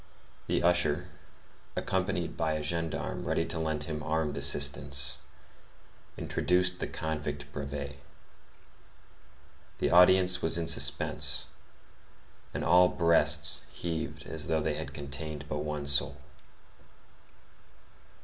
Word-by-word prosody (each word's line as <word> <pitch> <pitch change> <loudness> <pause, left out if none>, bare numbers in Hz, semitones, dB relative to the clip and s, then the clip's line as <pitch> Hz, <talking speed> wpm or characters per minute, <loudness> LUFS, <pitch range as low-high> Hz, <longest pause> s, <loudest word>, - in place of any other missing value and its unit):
The - - 0
usher, 85 -1 +2 0.7
accompanied 95 -1 -1
by 80 -1 0
a 75 -1 -3
gendarme 85 +1 -2
ready - - 0
to - - -5
lend 80 -2 -2
him 75 -1 -4
armed 75 -1 -1
assistance, 70 0 -1 1.0
introduced 90 0 0
the - - -3
convict 75 -2 -4
Brevet. 70 0 -6 1.8
The - - 0
audience 90 +1 +8
was 80 - +2
in 85 - -1
suspense; 80 0 +1 1.0
and - - -4
all 90 +1 +6
breasts 75 -3 +2
heaved 85 -2 -5
as 80 -3 -5
though 80 -1 +1
they 80 0 -1
had 80 +1 -5
contained 70 +1 -6
but 75 - -3
one 75 -1 -4
soul. 70 0 +1
80 Hz, 110 wpm, -30 LUFS, 70-85 Hz, 1.8 s, audience